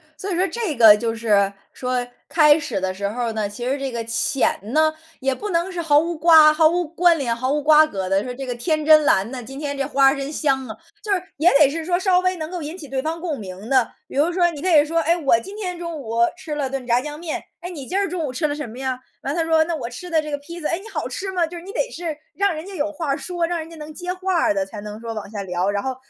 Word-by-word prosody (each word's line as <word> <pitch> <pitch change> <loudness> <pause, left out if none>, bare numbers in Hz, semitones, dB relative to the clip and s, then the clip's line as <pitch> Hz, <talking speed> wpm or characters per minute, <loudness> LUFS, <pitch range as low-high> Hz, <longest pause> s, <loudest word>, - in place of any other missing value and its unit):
所 380 +6 -5
以 - - 0
说 370 +3 +2
这 430 -8 -3
个 220 -3 +9
就 225 +1 -2
是， 205 -4 +2 0.2
说， 250 -1 -2 0.2
开 300 -2 +6
始 235 -9 -3
的 185 0 -2
时 200 +1 -3
候 245 +4 -3
儿 230 -1 -2
呢， 215 -2 -2
其 240 +4 -6
实 275 +2 -1
这 270 -1 -3
个 235 -1 -3
浅 230 +3 0
呢， 310 0 +3 0.3
也 270 0 0
不 415 +10 -5
能 345 +1 0
是 355 -2 -3
毫 300 -3 +4
无 335 +2 -2
瓜 310 -1 +7
毫 310 0 +5
无 350 0 -1
关 340 +1 +3
联、 245 -6 -1
毫 255 +3 -1
无 295 +1 +1
瓜 305 +1 +6
葛 195 -10 -4
地 195 +2 +1
说： 250 - -5
“这 270 +1 -6
个 250 - -3
天 310 +4 -1
真 310 0 +7
蓝 195 -5 +3
呐， 260 -2 -5
今 270 +4 -9
天 290 -1 -3
这 275 0 -1
花 275 -1 +4
真 275 0 -4
香 270 -4 0
啊”， 220 0 -8 0.3
就 420 - -3
是 380 -2 +2 0.2
也 320 +5 +5
得 295 - +7
是 325 +3 -4
说 350 +2 0
稍 370 -1 +3
微 370 0 +1
能 315 -2 -5
够 360 -2 -4
引 310 +4 -6
起 310 -6 -9
对 265 0 -2
方 320 +3 -3
共 325 -5 -3
鸣 190 +1 -8
的。 260 -3 +3 0.2
比 - - -11
如 300 +5 +2
说， 350 -1 +3
你 295 -3 -8
可 370 - 0
以 300 -4 +6
说： 330 +2 0
“哎， 335 +2 +2
我 275 -8 +3
今 395 - -10
天 365 -4 -4
中 335 -2 -5
午 230 -3 -4 0.2
吃 310 - -6
了 280 -3 -2
顿 270 -1 -4
炸 245 0 +2
酱 295 +2 -7
面， 330 -2 -4 0.2
哎， 350 - -6
你 285 -7 -8
今 375 - -2
儿 400 0 +1
中 340 -1 -3
午 285 - -3
吃 305 +5 -1
了 290 - -2
什 295 -3 -5
么 230 +2 -10
呀？” 260 -1 -2 0.3
完 275 - -2
了 340 - -2
他 - - 0
说： 320 -1 +4
“那 335 0 -2
我 250 -6 -5
吃 340 +9 -9
的 320 -1 +3
这 305 - -7
个 290 - -2
披 335 +5 -10
萨”， 300 - -1
“哎， 335 - 0
你 380 - -11
好 - - -3
吃 385 0 -4
吗？” 360 -3 +1
就 345 +2 -8
是 340 - -9
你 390 - -8
得 - - -1
是 335 -8 -5 0.2
让 400 -2 +1
人 310 +2 -6
家 395 - -8
有 305 -2 -1
话 295 -3 -2
说， 345 +1 -2
让 345 0 -1
人 315 - -6
家 335 - -11
能 305 0 -8
接 355 +3 -4
话 375 0 -2
儿 320 -1 +3
的， 295 -1 0
才 215 - -9
能 210 +1 -8
说 230 -1 -5
往 210 -2 -5
下 205 -2 -4
聊， 180 0 -1
然 200 0 -1
后， 265 -1 -2
300 Hz, 325 characters per minute, -22 LUFS, 255-340 Hz, 0.3 s, 个